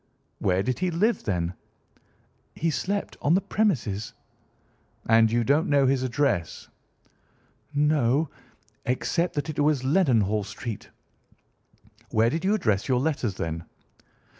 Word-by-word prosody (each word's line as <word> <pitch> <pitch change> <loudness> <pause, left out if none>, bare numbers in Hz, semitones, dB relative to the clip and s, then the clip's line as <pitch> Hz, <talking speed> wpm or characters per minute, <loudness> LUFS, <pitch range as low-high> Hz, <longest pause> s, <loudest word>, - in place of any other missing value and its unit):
"Where 95 +1 +1
did 125 +1 -2
he 185 0 +1
live, 205 +8 +1
then?" 90 -3 -1 1.0
"He 165 0 0
slept 200 +6 -2
on 155 +4 +3
the - - +4
premises." 130 - -1 0.9
"And 115 0 +5
you 120 0 +2
don't 145 +6 +2
know 140 -2 +4
his 135 0 +2
address?" 130 - -1 1.1
"No—except 150 +3 -1
that 145 0 -2
it 150 - -6
was 145 -3 +2
Leadenhall 120 - +2
Street." 110 +1 -7 1.2
"Where 115 0 +2
did 165 +4 -2
you 200 +3 +3
address 110 - 0
your 130 -2 +2
letters, 130 -8 -1
then?" 80 -1 -4
130 Hz, 120 wpm, -26 LUFS, 110-160 Hz, 1.2 s, And